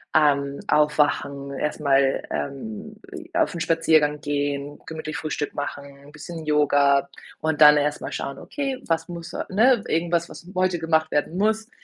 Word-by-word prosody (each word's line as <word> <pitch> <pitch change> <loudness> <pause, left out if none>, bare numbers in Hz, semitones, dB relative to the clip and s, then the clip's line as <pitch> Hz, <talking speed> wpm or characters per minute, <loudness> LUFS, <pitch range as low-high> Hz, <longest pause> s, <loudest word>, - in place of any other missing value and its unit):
ähm, 140 -2 +3
aufwachen, 145 -2 +1
erst 150 +2 -3
mal, 135 -2 +2
ähm, 210 +10 -5 0.2
e 340 -2 -9
auf 325 -10 +1
‘n 170 - -5
Spaziergang 160 -3 +2
gehen, 145 0 -2
gemütlich 155 -1 -5
Frühstück 155 -2 -3
machen, 145 0 -5
‘n 140 +1 -16
bisschen 160 +2 -8
Yoga 145 -2 +3 0.3
und 160 -1 -1
dann 150 0 +9
erst 150 0 0
mal - - -5
schauen: 140 0 -5
„Okay, 275 -2 -4
was 165 +2 -1
muss 170 -1 -8
a“ - - -3
ne, 225 +3 +4
irgendwas, 170 +1 0
was 170 - -12
heute 185 -1 +1
gemacht 160 -1 +1
werden 155 +4 -1
muss, 220 +2 0
155 Hz, 160 wpm, -24 LUFS, 145-175 Hz, 0.3 s, dann